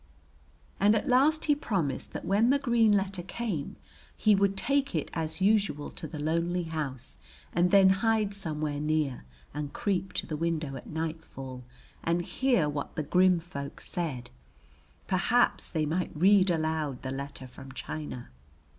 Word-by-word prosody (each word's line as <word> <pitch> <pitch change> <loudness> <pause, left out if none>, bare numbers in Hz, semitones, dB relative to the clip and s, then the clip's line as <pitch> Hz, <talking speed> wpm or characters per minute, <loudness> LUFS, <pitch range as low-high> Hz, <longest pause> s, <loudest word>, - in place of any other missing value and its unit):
And 205 +2 +5
at 220 - -1
last 280 +5 +4
he 295 - +4
promised 185 - -2
that - - -5
when 210 +5 +3
the 280 - +5
green 235 -5 +3
letter 195 -2 +1
came 190 -5 -4 0.4
he 215 - +4
would 195 0 +2
take 280 +4 +1
it - - -2
as 160 +2 -3
usual 195 -7 +2
to 160 - -6
the 155 - -7
lonely 170 +4 0
house 155 -6 -5 0.4
and 175 +2 +3
then 195 0 +7
hide 210 +1 +2
somewhere 155 -6 -3
near 150 - -1 0.3
and 145 0 -4
creep 195 -4 -1
to - - -1
the 155 - -4
window 160 -3 -2
at 130 - -9
nightfall 155 -5 -5 0.4
and 170 +1 +1
hear 215 - +1
what 145 -1 -4
the 155 - -1
grim 180 +3 +4
folk 140 -4 -7
said; 135 -9 -4 0.7
perhaps - - +2
they 155 -1 0
might 175 +4 -1
read 190 +4 +5
aloud 155 -5 -1
the 130 - -3
letter 140 0 -6
from 135 +1 -11
China. 140 - -6
170 Hz, 155 wpm, -29 LUFS, 150-200 Hz, 0.7 s, then